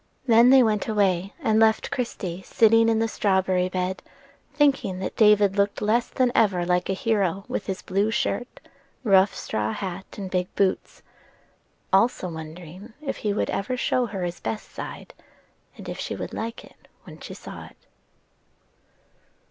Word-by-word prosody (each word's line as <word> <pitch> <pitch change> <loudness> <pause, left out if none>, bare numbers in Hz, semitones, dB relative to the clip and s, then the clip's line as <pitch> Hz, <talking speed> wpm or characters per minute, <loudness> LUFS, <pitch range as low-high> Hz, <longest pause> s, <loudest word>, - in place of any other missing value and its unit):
Then 235 0 +6
they 265 -1 +7
went 215 -2 0
away, 195 -3 +1
and 220 0 +2
left 220 0 +3
Christie 190 -7 -4
sitting 225 +3 +4
in 225 - +2
the 225 +1 +1
strawberry 190 -4 +1
bed, 185 0 -2 0.5
thinking 280 -10 +1
that 185 - -5
David 210 -3 +4
looked 200 0 +1
less 225 +3 +1
than 255 -2 +1
ever 185 -5 +2
like 180 +1 0
a - - +2
hero 195 -2 0
with - - -4
his 190 -2 -4
blue 200 +3 0
shirt, 245 +2 -2 0.4
rough 195 -3 +4
straw 110 0 -2
hat, 190 -1 -5
and 195 -2 -6
big 180 -1 0
boots; 195 -2 -1 0.9
also 195 -2 +2
wondering 170 +6 -9
if 295 -3 -4
he 210 - -1
would 200 - -1
ever 250 +6 -2
show 250 -1 +1
her 195 -4 -5
his 175 0 -4
best 215 - -5
side, - - -8 0.6
and - - -10
if - - -6
she - - -4
would - - -6
like 230 +1 -5
it - - -22 0.2
when - - -13
she - - -9
saw - - -10
it. - - -19
200 Hz, 165 wpm, -24 LUFS, 185-225 Hz, 0.9 s, they